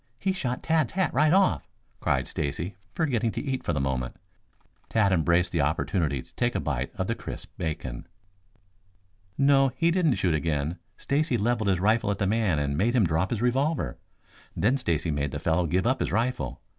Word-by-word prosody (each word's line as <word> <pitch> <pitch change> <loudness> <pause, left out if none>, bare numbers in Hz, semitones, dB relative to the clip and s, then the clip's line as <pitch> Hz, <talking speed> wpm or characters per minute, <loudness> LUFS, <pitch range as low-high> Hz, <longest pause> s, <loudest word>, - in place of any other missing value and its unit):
He 190 +10 0
shot 130 -10 -3
Tad's 160 -7 +1
hat 190 -5 0
right 150 +3 +4
off," 185 - +3 0.3
cried - - 0
Stacy, 85 +7 -3 0.2
forgetting 125 -8 +1
to - - -3
eat 135 -2 -2
for - - -1
the 75 - -1
moment. 65 -2 -2 0.7
Tad 110 -3 +3
embraced 85 0 +2
the 85 - +1
opportunity 75 -1 0
to - - -25
take - - 0
a - - +1
bite - - -2
of - - -2
the - - 0
crisp - - -8
bacon. 75 -7 -4 1.3
"No, 135 0 +5
he 165 +6 +2
didn't 165 -7 +2
shoot 90 -3 +1
again. 75 +1 -1 0.2
Stacy 140 -2 0
leveled 110 -1 +1
his 95 -2 +2
rifle 110 +2 +2
at 100 - 0
the 100 - 0
man 105 -5 +1
and 70 -1 -1
made 115 - +1
him 115 -6 +4
drop 80 +3 +1
his 115 -1 -2
revolver. 130 - 0 0.6
Then 115 +7 +3
Stacy 85 - -1
made 75 -1 -1
the - - -4
fellow 85 +1 +1
give 90 +6 +1
up 130 +2 +2
his - - -1
rifle. 110 - -1
100 Hz, 190 wpm, -27 LUFS, 80-130 Hz, 1.3 s, No